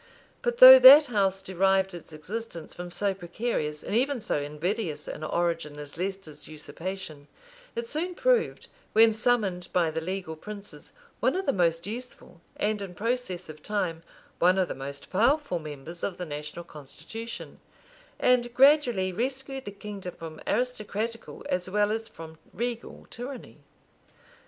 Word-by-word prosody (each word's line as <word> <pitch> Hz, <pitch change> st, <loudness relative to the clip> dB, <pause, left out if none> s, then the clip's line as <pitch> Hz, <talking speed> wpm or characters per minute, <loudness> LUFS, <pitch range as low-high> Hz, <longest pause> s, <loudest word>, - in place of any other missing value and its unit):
But 485 Hz, 0 st, -1 dB
though -, -, +12 dB
that -, -, +11 dB
house 195 Hz, -6 st, 0 dB
derived 190 Hz, 0 st, +2 dB
its 170 Hz, -1 st, -10 dB
existence 170 Hz, +2 st, -6 dB
from 175 Hz, 0 st, -7 dB
so 200 Hz, +3 st, 0 dB
precarious 175 Hz, -4 st, -3 dB
and -, -, -3 dB
even 265 Hz, +2 st, +1 dB
so 150 Hz, -, -1 dB
invidious 150 Hz, +2 st, -3 dB
an 155 Hz, -, -6 dB
origin 165 Hz, -2 st, -1 dB
as 145 Hz, -1 st, -8 dB
Leicester's 185 Hz, -5 st, -5 dB
usurpation, 155 Hz, 0 st, -7 dB, 0.5 s
it 470 Hz, 0 st, -3 dB
soon 350 Hz, 0 st, -2 dB
proved, -, -, +1 dB, 0.3 s
when 225 Hz, +1 st, +6 dB
summoned 210 Hz, -6 st, 0 dB
by 170 Hz, -3 st, +2 dB
the 160 Hz, +1 st, -3 dB
legal 180 Hz, -1 st, -4 dB
princes, 205 Hz, +5 st, -8 dB, 0.3 s
one -, -, +2 dB
of 380 Hz, +1 st, -2 dB
the 275 Hz, -, +2 dB
most 170 Hz, -3 st, +1 dB
useful, 225 Hz, -5 st, -8 dB
and, 210 Hz, 0 st, -1 dB
in 185 Hz, -3 st, -7 dB
process 230 Hz, -4 st, -2 dB
of 155 Hz, -1 st, -11 dB
time, 180 Hz, -5 st, -2 dB, 0.4 s
one 180 Hz, +2 st, +4 dB
of 185 Hz, -2 st, +2 dB
the -, -, -4 dB
most 140 Hz, +1 st, -8 dB
powerful 235 Hz, -, +2 dB
members 155 Hz, +2 st, -8 dB
of 185 Hz, -, -2 dB
the 180 Hz, -, -4 dB
national 150 Hz, +2 st, -6 dB
constitution; 220 Hz, +11 st, -9 dB, 0.6 s
and 240 Hz, -1 st, +2 dB
gradually 250 Hz, -9 st, +4 dB
rescued 265 Hz, +4 st, -3 dB
the -, -, -4 dB
kingdom 200 Hz, -2 st, -8 dB
from 160 Hz, -1 st, -9 dB
aristocratical 230 Hz, -2 st, -3 dB
as 180 Hz, 0 st, -1 dB
well 205 Hz, +2 st, +2 dB
as 225 Hz, +1 st, -2 dB
from 160 Hz, -1 st, -11 dB, 0.2 s
regal 235 Hz, +2 st, -4 dB
tyranny. 250 Hz, +2 st, -6 dB
195 Hz, 150 wpm, -27 LUFS, 165-235 Hz, 0.6 s, though